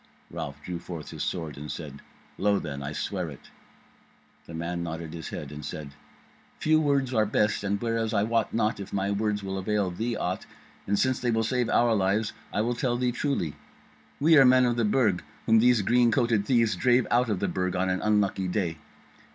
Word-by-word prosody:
Ralph 70 +1 -6
drew 90 -1 -5
forth 85 -3 -8
his - - -7
sword 80 -5 -3
and 75 +1 -7
said: 70 -4 -7 0.4
"Lo 100 0 +3
then! 70 -5 -5
I 70 +1 -4
swear 90 +2 -3
it." 70 - -13 1.0
The 80 - -8
man 85 +1 -3
nodded 80 -1 -5
his 80 -2 -6
head, 75 - -6
and 75 0 -8
said: 75 0 -6 0.7
"Few 155 0 +3
words 140 -3 +1
are 110 -2 +3
best; 105 0 +1
and 100 0 0
whereas 115 -1 -1
I 100 -2 +2
wot 115 0 0
not 110 -1 0
if 100 - -7
my 100 0 -1
words 105 0 -1
will 95 0 -3
avail 100 -1 0
thee 115 +6 -2
aught, 90 +1 -3 0.4
and 100 +1 +1
since 130 +2 +1
they 125 - -1
will 110 -1 +2
save 125 +1 0
our 120 -1 +3
lives, 105 +2 +1 0.2
I - - 0
will 120 +3 0
tell 120 -1 -1
thee 125 0 +1
truly. 120 - -1 0.7
We 155 +1 +6
are - - +8
men 130 0 +6
of 120 -1 +1
the 120 -2 +1
Burg 105 -4 +2 0.2
whom 110 0 +5
these 120 -2 +4
green 120 +2 +4
coated 115 -5 +1
thieves 115 -4 +3
drave 125 -1 +3
out 120 0 +3
of 100 -4 0
the - - 0
Burg 90 -1 -1
on 95 +1 +1
an 95 0 0
unlucky 100 -3 +1
day. 90 -4 -2
105 Hz, 210 wpm, -27 LUFS, 90-120 Hz, 1.0 s, are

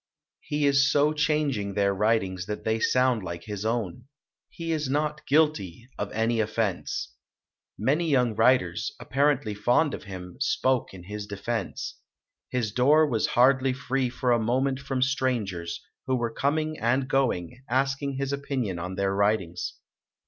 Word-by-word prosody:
He 150 0 -1
is 140 0 +4
so 150 +1 +3
chang 150 -1 +1
ing 100 -3 -4
their 100 -1 +2
writings 95 -3 0
that 105 0 -4
they 110 0 0
sound 125 -1 +2
like 85 -2 -6
his 105 +1 -5
own. 115 0 -2 0.4
He 165 -1 -5
is 150 -4 -1
not 150 +2 -1
guilty 135 - +1
of - - -3
any 115 +1 0
offense". 110 - -2 0.6
Many 150 +9 +1
young 125 -5 +3
writers, 110 -6 +2
apparently 140 -5 +1
fond 120 +9 +2
of - - -6
him, 90 -1 -8
spoke 130 -3 +1
in 95 -2 -11
his 105 +2 -6
de 100 -1 -6
fense. 115 -1 -3 0.5
His 120 -4 -1
door 145 +6 +5
was 115 -6 +1
hardly 130 +1 +5
free 130 0 -1
for 125 0 -1
a 120 - +4
moment 130 +4 +1
from 135 -2 -1
strangers, 110 -11 -1 0.3
who 130 - +2
were 120 -2 -2
coming 155 +4 0
and 130 +3 +1
going, 130 - 0
ask 135 +2 +1
ing 140 -1 -2
his 135 +1 -2
opinion 130 -10 -2
on 90 +2 -4
their 100 0 0
writings. 100 -4 0
125 Hz, 160 wpm, -27 LUFS, 105-140 Hz, 0.6 s, door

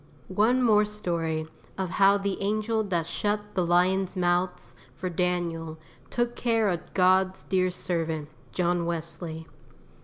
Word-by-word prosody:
ONE 240 +6 +3
more 215 -3 +5
story 170 -7 -2 0.3
of 190 -2 -2
how 200 +1 +5
the 200 0 -2
angel 215 +2 0
that 175 -5 -1
shut 210 +4 -2
the 185 - +1
lions' 180 +2 +2
mouths 175 -7 0 0.2
for 185 +4 -4
Daniel 170 -2 -1 0.3
took 240 0 -1
care 225 -3 +2
of 175 -2 -4
God's 185 0 +3
dear 185 -1 +1
servant, 165 -4 -2 0.2
John 175 -1 0
Wesley. 165 -1 -4
185 Hz, 130 wpm, -27 LUFS, 170-205 Hz, 0.3 s, more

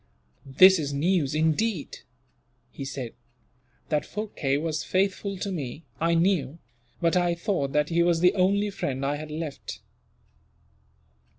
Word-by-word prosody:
"This 185 +7 +7
is 145 -2 -3
news, 155 -2 +1
indeed," 160 +3 0 0.7
he 140 - -7
said. 135 -3 -5 0.8
"That 150 -2 +1
Phurkay 185 -10 -2
was 155 -1 -2
faithful 195 +1 -1
to 195 +2 -3
me, 150 -3 -5 0.2
I 170 +1 +2
knew; 165 -5 +1 0.4
but 170 0 +2
I 175 -1 +2
thought 170 -5 -1
that 150 0 +2
he 170 0 +2
was 170 -1 +3
the 180 +1 +5
only 200 +2 +2
friend 135 -7 -3
I 145 +1 0
had 155 +1 -7
left. 155 -1 -6
165 Hz, 135 wpm, -26 LUFS, 145-185 Hz, 0.8 s, This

